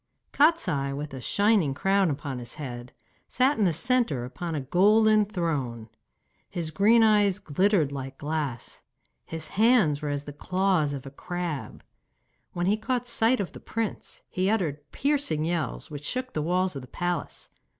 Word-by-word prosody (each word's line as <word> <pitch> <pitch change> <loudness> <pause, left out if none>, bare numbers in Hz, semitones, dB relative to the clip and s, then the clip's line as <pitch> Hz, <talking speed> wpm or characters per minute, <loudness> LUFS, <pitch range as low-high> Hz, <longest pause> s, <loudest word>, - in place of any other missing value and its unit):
Kostiei, 185 - +2
with 150 -1 -6
a 130 - -6
shining 200 - +2
crown 195 +2 +2
upon 140 -3 -4
his 120 -1 -5
head, 125 -4 -7 0.4
sat 260 +1 +2
in 210 - +4
the 175 - +3
centre 180 - +1
upon 160 +6 -5
a - - -1
golden 210 - +4
throne. 145 - -3 0.6
His 165 -3 -3
green 220 +7 +5
eyes 205 -3 +4
glittered 185 -3 +1
like 135 -1 -6
glass, 145 -5 -4 0.4
his 160 -1 -6
hands 210 - +3
were 150 - -2
as 145 0 -2
the 145 - -8
claws 180 -2 +1
of 140 -1 -6
a 135 - -8
crab. 175 0 -5 0.7
When 175 0 -1
he 205 +3 +2
caught 245 +2 -2
sight 235 +1 +2
of 195 - -3
the - - -11
prince 225 -2 -4
he 185 +1 -1
uttered 150 -9 -2
piercing 275 - 0
yells, 165 -2 -3
which 145 -1 -7
shook 255 0 -3
the 155 - -1
walls 180 +2 0
of 135 - -5
the 125 - -11
palace. 175 +5 -4
175 Hz, 165 wpm, -27 LUFS, 145-210 Hz, 0.7 s, green